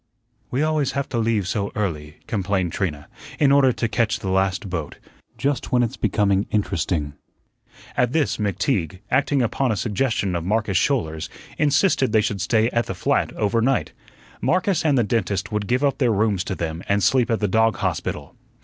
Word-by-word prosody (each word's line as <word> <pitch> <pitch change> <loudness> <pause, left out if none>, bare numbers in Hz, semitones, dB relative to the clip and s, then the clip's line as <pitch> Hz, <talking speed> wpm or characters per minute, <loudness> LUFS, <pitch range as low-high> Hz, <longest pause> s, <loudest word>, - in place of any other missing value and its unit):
"We 130 +4 0
always 155 -3 +1
have 140 0 -2
to 120 - -1
leave 110 -4 +1
so 100 +1 -2
early," 75 -8 -3
complained 95 -4 -1
Trina, 75 -7 -3 0.3
"in 140 -2 +4
order 140 -2 +5
to 115 0 -1
catch 115 0 0
the 95 - -4
last 95 +1 0
boat. 80 -5 -4 0.4
Just 140 -3 -1
when 125 -1 +3
it's 115 - -2
becoming 100 -2 +1
interesting." 85 -7 -1 0.8
At 125 -1 +2
this 155 -1 +1
McTeague, 100 - -1
acting 135 0 +2
upon 120 +2 0
a - - 0
suggestion 105 -4 0
of 85 - -2
Marcus 105 +1 0
Schouler's, 85 - 0 0.3
insisted 145 - +2
they 110 - +5
should 100 -2 -2
stay 110 +2 +2
at 115 -1 0
the - - -4
flat - - 0
over 105 +2 0
night. 130 +3 +1 0.5
Marcus 185 -1 +1
and 145 -4 +3
the 120 - +4
dentist 105 -2 -1
would 105 -1 -2
give 130 +3 +1
up 140 0 +1
their 125 -4 +3
rooms 100 -3 +1
to 95 - -3
them 80 -1 -4
and 100 0 +2
sleep 125 +5 +3
at 115 - +1
the 105 - +1
dog 110 +1 +3
hospital. - - -3
110 Hz, 185 wpm, -22 LUFS, 95-125 Hz, 0.8 s, order